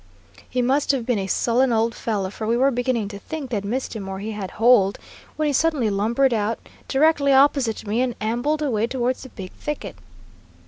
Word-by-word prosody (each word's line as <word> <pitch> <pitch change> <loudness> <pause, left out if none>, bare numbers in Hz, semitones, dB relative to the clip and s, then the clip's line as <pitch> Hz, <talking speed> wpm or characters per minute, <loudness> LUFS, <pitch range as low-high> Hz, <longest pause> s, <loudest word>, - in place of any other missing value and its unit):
He 250 -1 0
must 270 +4 +1
have 255 -4 -2
been 240 -4 +1
a 190 - -3
sullen 245 +5 +2
old 230 0 +1
fellow, 200 -4 -2
for 215 +1 -5
we 230 +1 +2
were 270 +2 +3
beginning 245 -3 -1
to 200 -1 -8
think 280 +2 -6
they 225 - 0
had 200 - -4
missed 240 +5 -3
him 195 -3 -5
or 190 - -4
he 210 +3 -5
had 205 -3 -5
holed, 225 -4 +4 0.4
when 310 - -1
he 295 - +1
suddenly 280 -7 +2
lumbered 235 +6 +2
out 220 +1 0 0.3
directly 285 0 +3
opposite 270 -5 +3
me 215 +4 0
and 250 -3 -1
ambled 245 +8 -1
away 230 -6 0
towards 250 0 -1
the 260 - -10
big 190 -6 -9
thicket. 295 - -6
240 Hz, 210 wpm, -23 LUFS, 215-270 Hz, 0.4 s, holed